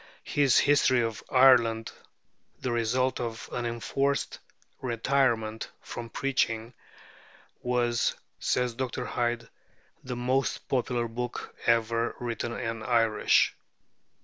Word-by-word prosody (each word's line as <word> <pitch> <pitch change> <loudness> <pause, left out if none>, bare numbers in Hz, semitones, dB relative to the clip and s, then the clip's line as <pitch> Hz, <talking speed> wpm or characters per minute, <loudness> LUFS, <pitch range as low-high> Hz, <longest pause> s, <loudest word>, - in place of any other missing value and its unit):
His 140 -5 +3
'History 140 -3 +4
of 115 -2 -2
Ireland,' 120 -4 +5 0.7
the 125 - -2
result 120 +3 +1
of 115 -2 -4
an 120 -1 -2
enforced 135 +4 -1 0.4
retirement 115 -3 0
from 115 -1 -7
preaching, 115 -4 -1 0.9
was, 120 -1 +1 0.2
says 125 -1 0
Dr. 125 0 -3
Hyde, 120 -1 -1 0.6
"the 125 -1 -4
most 130 +2 -1
popular 125 -2 0
book 120 +2 -5
ever 115 0 +2
written 120 -1 -3
in 115 -1 -3
Irish." 115 -1 +3
120 Hz, 100 wpm, -28 LUFS, 115-130 Hz, 0.9 s, Ireland